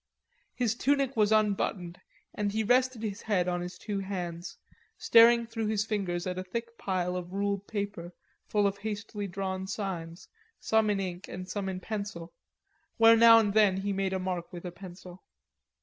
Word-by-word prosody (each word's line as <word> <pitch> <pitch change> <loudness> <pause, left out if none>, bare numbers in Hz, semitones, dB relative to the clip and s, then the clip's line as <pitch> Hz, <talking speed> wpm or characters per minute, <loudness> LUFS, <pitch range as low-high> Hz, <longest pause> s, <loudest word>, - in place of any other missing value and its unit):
His 240 -4 +1
tunic 275 +2 +1
was 215 -1 +3
unbuttoned 200 -4 0 0.3
and 205 -1 -1
he 220 +1 0
rested 250 0 +2
his 210 0 -4
head 185 -5 0
on 175 -1 -1
his 180 +1 -6
two 205 -2 -4
hands, 180 -3 -5 0.4
staring 235 0 +6
through 225 -1 -3
his 210 -1 0
fingers 190 -5 -2
at 185 0 -3
a - - -4
thick 230 +5 -5
pile 180 -2 -1
of 180 0 -6
ruled 200 0 -2
paper 200 -5 -4 0.4
full 205 -1 +1
of 200 0 0
hastily 210 0 -5
drawn 190 0 -4
signs, 180 -4 -5 0.3
some 220 -1 +2
in 205 -1 +1
ink 185 0 -5
and 185 0 -7
some 195 0 -3
in 185 -1 -4
pencil, 200 -4 -6 0.6
where 225 0 +7
now 230 0 +8
and 210 -3 +2
then 205 -3 +4
he 200 +1 -2
made 195 0 -1
a - - 0
mark 185 -2 -4
with 175 0 -9
a 180 - -4
pencil. 180 0 -11
200 Hz, 180 wpm, -29 LUFS, 185-220 Hz, 0.6 s, now